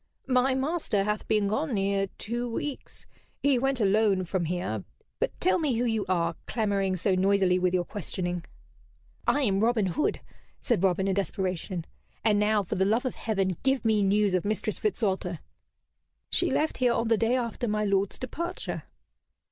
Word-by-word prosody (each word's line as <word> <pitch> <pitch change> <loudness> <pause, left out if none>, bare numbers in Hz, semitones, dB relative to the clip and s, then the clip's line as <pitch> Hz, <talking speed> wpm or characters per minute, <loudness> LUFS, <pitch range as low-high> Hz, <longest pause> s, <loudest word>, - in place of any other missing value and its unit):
"My 260 0 +3
master 265 - 0
hath 210 +1 -2
been 210 -2 +2
gone 265 +5 -1
near 195 0 +1
two 240 +2 -3
weeks. 285 +4 -5 0.4
He 280 -3 +4
went 270 0 +1
alone 200 -2 +3
from 180 0 -1
here. 175 +2 -2 0.4
But - - -2
tell 370 0 +3
me 295 -7 +1
who 240 +2 +1
you 225 -3 0
are, 170 -2 +1
clamoring 200 -4 0
so 190 +2 +1
noisily 190 -1 +3
with 180 0 +1
your 175 -1 +1
questioning?" 180 -3 -3 0.8
"I 290 - +3
am 195 -5 +2
Robin 225 -1 +2
Hood," 185 - 0 0.4
said 235 -8 +1
Robin, 190 0 +2
in 195 - +2
desperation, 185 -2 -2 0.4
"and 210 -2 +3
now, 210 0 +2
for 180 - -4
the 190 - +2
love 225 +7 +1
of 255 - -1
Heaven, 195 -5 -1
give 265 -3 +1
me 220 -2 +3
news 200 0 +3
of 185 - +1
Mistress 215 0 -1
Fitzwalter." 190 -4 -1 0.9
"She - - +4
left 310 - 0
here 250 -2 +3
on 230 - 0
the 225 - +4
day 230 +3 +2
after 240 0 -2
my 210 0 0
lord's 195 -1 +1
departure." 340 +7 -4
210 Hz, 170 wpm, -28 LUFS, 190-240 Hz, 0.9 s, He